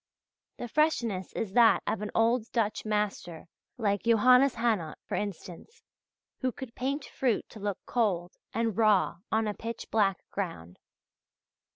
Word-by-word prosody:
The 240 - -5
freshness 235 - 0
is 195 -4 -3
that 235 -1 +5
of 215 - -2
an 210 - -3
old 230 +1 +2
Dutch 225 -3 -1
master 210 -6 -2 0.3
like 205 -4 0
Johannes 250 +4 +5
Hannot, 220 -10 0
for - - -8
instance, 205 - -6 0.6
who 255 - 0
could 245 -1 -9
paint 270 +3 -2
fruit 245 -5 -1
to 220 - -11
look 205 -2 -2
cold 185 -7 0 0.2
and 225 -3 -1
raw 210 -5 +3
on 220 0 +2
a 210 - -1
pitch 230 +2 -7
black 200 -3 +1
ground. 125 - -5
220 Hz, 145 wpm, -29 LUFS, 200-240 Hz, 0.6 s, that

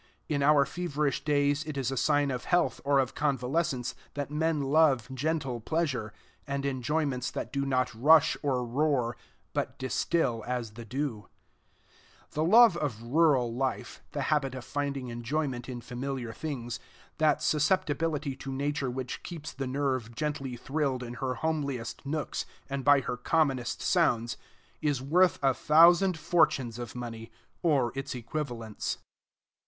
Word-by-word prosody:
In 145 -2 0
our 145 0 +5
feverish 150 -5 -2
days 145 0 +2
it 155 -2 -5
is 135 -1 -1
a - - -2
sign 145 +2 +2
of 125 -1 -4
health 175 -8 +1
or 140 0 +3
of 130 -2 +1
convalescence 135 -2 0 0.2
that 145 0 -3
men 160 +1 +1
love 140 -3 +3
gentle 135 -2 -1
pleasure, 130 -5 -1 0.4
and 140 0 -2
enjoyments 135 -1 -1
that 120 - -5
do 140 0 -1
not 130 -2 +1
rush 150 +7 +5
or 130 -4 0
roar, 125 -2 +1 0.4
but - - -2
distill 130 -2 0
as 120 -3 -2
the 115 +2 -10
dew. 125 -3 -3 1.0
The 155 - -1
love 220 +3 +7
of 125 -9 -3
rural 130 -2 +3
life, 130 0 -3
the 145 - -1
habit 135 -3 0
of 130 - -7
finding 140 -3 -3
enjoyment 125 +2 -3
in 120 -2 -5
familiar 125 -1 -4
things, 120 -6 -5 0.4
that 155 -2 +3
susceptibility 150 -2 +1
to 135 - -6
Nature 140 0 -1
which 125 0 -4
keeps 165 -4 -7
the 135 0 -4
nerve 130 -4 -1
gently 140 -3 -3
thrilled 135 -1 -1
in 120 0 -6
her 130 -1 -1
homliest 140 -6 -2
nooks 150 0 -2 0.2
and 140 -1 -3
by 145 0 +6
her 125 - -3
commonest 135 -3 0
sounds, 120 -10 +2 0.5
is 145 -4 +1
worth 170 +7 +3
a 135 -1 +4
thousand 170 +6 +5
fortunes 135 -8 +2
of 120 0 -6
money, 115 -2 -6 0.3
or 140 -8 +2
its 135 0 -4
equivalents. 120 -3 -4
135 Hz, 150 wpm, -29 LUFS, 125-150 Hz, 1.0 s, love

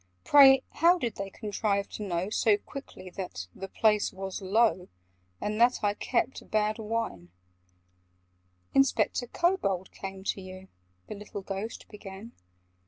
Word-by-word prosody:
Pray, 270 -2 +8
how 345 +3 +4
did 240 -10 -3
they 195 0 -4
contrive 200 -1 -1
to - - -8
know 185 0 -2
So 215 -1 +3
quickly 205 -6 -10
that 175 - -6
'the 195 - -7
place 210 +1 +2
was 190 0 -6
low,' 195 -1 +2 0.5
And 215 +2 -2
that 245 -1 +4
I 205 -1 +2
'kept 250 +4 -2
bad 215 +1 +1
wine'?" 215 - -3 1.4
"Inspector 270 -2 +2
Kobold 230 - 0
came 190 0 -7
to 195 - -2
you—" 185 0 -10 0.4
The - - -7
little 205 -1 -8
Ghost 195 +4 -5
began. 205 +1 -10
205 Hz, 135 wpm, -29 LUFS, 190-230 Hz, 1.4 s, Pray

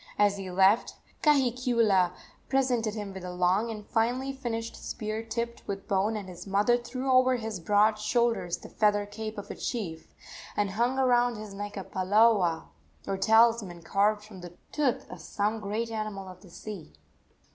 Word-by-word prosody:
As 205 -1 +3
he 195 -1 -6
left, 190 +4 +3 0.3
Kahikiula 240 - +3 0.4
presented 245 -5 +1
him 205 -2 -5
with 190 -1 -8
a 180 - -5
long 180 +5 +1
and 210 -2 -6
finely 245 +5 0
finished 230 -3 -4
spear 215 0 -4
tipped 235 +1 -4
with 195 -1 -5
bone, 205 +3 +1
and 200 -3 -6
his 180 +1 -10
mother 205 +5 +3
threw 255 +2 -3
over 255 0 +5
his 220 -5 -4
broad 210 +4 +3
shoulders 215 -5 +1
the - - -12
feather 205 -1 +2
cape 215 +1 -6
of 205 - -6
a - - -6
chief, 170 -9 -5 0.4
and 205 -2 +1
hung 240 +6 0
around 245 -2 +3
his 215 -2 -8
neck 205 +1 -6
a 195 - -4
palaoa, 190 -3 +3 0.4
or 195 - -1
talisman 220 -3 +3
carved 205 +4 +1
from 205 -3 -12
the 175 0 -11
tooth 285 -5 0
of - - -9
some 210 +2 -1
great 215 +3 -3
animal 215 -3 -4
of 185 0 -11
the 195 - -15
sea. 195 -1 -9
215 Hz, 170 wpm, -28 LUFS, 195-235 Hz, 0.4 s, over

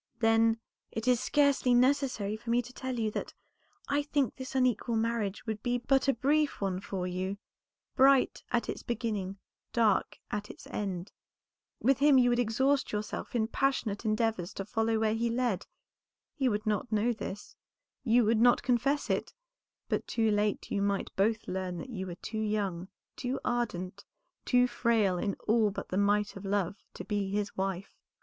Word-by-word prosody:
"Then, 225 0 +3 0.3
it 225 +2 -4
is 250 -2 +4
scarcely 280 -2 +3
necessary 250 -5 +2
for 230 +2 -9
me 240 +1 +3
to 250 +2 -12
tell 260 -1 -4
you 220 -2 0
that - - -5 0.5
I 285 +1 +1
think 285 -4 0
this 260 0 -7
unequal 250 -2 +1
marriage 225 -3 -1
would 220 -2 -3
be 245 0 0
but 270 +3 +2
a 275 - +5
brief 295 +5 +1
one 190 -2 -1
for 190 -2 -4
you; 185 +2 -3 0.6
bright 270 0 +4
at 240 -1 +1
its - - -4
beginning, 215 -5 -3 0.4
dark 220 -4 +2
at 210 0 -3
its - - -11
end. 190 -2 -4 0.7
With 270 +2 +3
him 285 -1 +6
you 245 -1 +5
would 240 - +2
exhaust 265 +4 +1
yourself 210 +3 -4
in 220 -2 +2
passionate 235 -5 0
endeavors 215 -4 0
to 195 - -4
follow 225 +1 0
where 220 0 +2
he 230 +1 0
led. 235 -5 -1 0.7
He 265 -3 +1
would 210 0 -2
not 215 +2 -1
know 220 +3 +2
this, 205 -2 -7 0.5
you 240 -1 +4
would 220 +1 +3
not 245 0 +5
confess 255 +4 +1
it, - - -2 0.5
but - - -1
too 225 -2 +1
late 210 0 0
you 200 - 0
might 200 -1 -1
both 220 +3 +1
learn 185 -1 -3
that 255 - -7
you 190 -4 -4
were 175 - -6
too 220 +4 -5
young, 200 -5 -1 0.3
too 255 +2 -3
ardent, 200 -6 -2 0.4
too 250 -1 +4
frail 225 -7 +1
in 200 +1 -1
all 220 -1 +4
but 200 - -6
the 185 - -2
might 205 +1 +2
of 195 - -8
love, 200 -1 -1 0.2
to - - -6
be 205 -2 -1
his 205 +1 -2
wife. 190 0 -3
225 Hz, 175 wpm, -30 LUFS, 200-245 Hz, 0.7 s, him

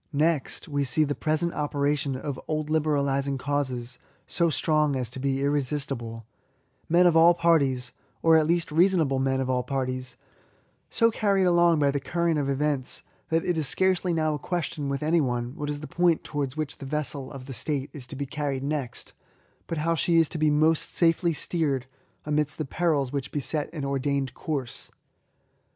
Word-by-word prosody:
Next, 150 -1 0
we^ 145 -2 0
see 140 +4 +2
the 145 -1 0
present 155 +3 0
operation 145 -1 0
of 135 0 -5
old 155 -1 -2
libe 155 -1 +2
ralising 140 -2 +1
causes 130 -3 -3 0.3
so 170 -1 +1
strong 155 -2 +1
as 125 -3 -3
to 130 - -7
be 135 0 0
irresistible; 135 -5 -2 0.6
men 175 +2 +5
of 175 -2 +5
all 170 +1 +7
parties 140 -7 +2
— - - -39
or, 165 0 +6
at 155 -1 +4
least, 170 -1 +1
reasonable 165 -5 +3
men 135 0 +1
of 130 - -1
all 130 -1 +1
parties 130 -1 -3 0.3
— - - -36 0.3
so 230 -1 +3
carried 200 -3 +2
along 175 -2 +4
by 145 -2 +3
the 140 - -1
current 170 +2 0
of 140 -1 -1
events, 140 -1 -1 0.3
that 165 0 +1
it 175 -3 0
is 150 - +2
scarcely 185 +3 +1
now 155 -2 +1
a 150 - -3
question 155 -3 -3
with 140 +2 -2
any 165 +2 +3
one 120 -1 -2
what 145 0 -4
is 145 0 -4
the 150 - -6
point 175 -2 +2
towards 145 -1 -3
which 155 -2 -3
the 140 - -7
vessel 140 -2 -3
of 135 -2 -9
the 135 - -7
State 140 +1 -3
is 135 -4 -7
to 140 - -7
be 140 +1 -3
carried 140 -2 -3
next, 140 -4 -4 0.5
but 165 - -3
how 165 +2 +1
she 165 +2 +2
is 165 -1 +5
to 160 - -5
be 155 0 +3
most 155 +2 +2
safely 170 0 +3
steered 150 -5 -1 0.4
amidst 150 -1 0
the 155 - -2
perils 145 -3 0
which 140 -1 -3
beset 145 +1 -2
an 150 -4 -4
ordained 140 -1 -1
course. 140 -6 -5
145 Hz, 190 wpm, -26 LUFS, 135-160 Hz, 0.6 s, all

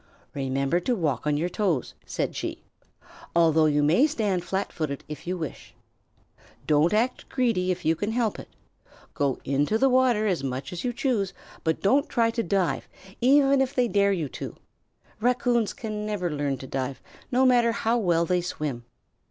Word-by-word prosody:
"Remember 135 +4 0
to 245 +8 0
walk 150 - -1
on 150 -1 +2
your 165 +4 0
toes," 180 - -1
said - - -2
she, - - -5 0.7
"although 160 -2 +5
you 145 -1 +2
may 175 - +4
stand 210 - -1
flat 190 +3 -3
footed 150 -4 -3
if 150 +2 -8
you 180 +1 -1
wish. 160 -4 -7 0.9
Don't 150 +3 +3
act 230 +4 0
greedy 230 -8 +1
if 185 0 -2
you 160 +1 +3
can 205 +6 -2
help 225 -2 0
it. - - -10 0.6
Go 140 -3 0
into 145 +10 +1
the 270 +4 +4
water 250 -4 +3
as 180 -9 0
much 135 +3 -4
as 175 - -5
you 250 - 0
choose, 230 -6 -1 0.3
but 160 -1 0
don't 275 +10 +3
try 230 -2 +2
to 230 - -1
dive, 185 -2 0 0.3
even 275 +2 +5
if 265 +1 -1
they 250 -1 +3
dare 200 -2 +3
you 170 -6 -1
to. - - -7 0.6
Raccoons 240 -1 +2
can 215 -5 -5
never 205 -5 -2
learn 145 -2 -1
to 130 - -9
dive, 130 0 -3 0.3
no 260 +1 +4
matter 240 -2 +4
how 230 +1 0
well 170 -5 +2
they 180 0 +1
swim. 145 -8 -4
185 Hz, 175 wpm, -26 LUFS, 150-235 Hz, 0.9 s, although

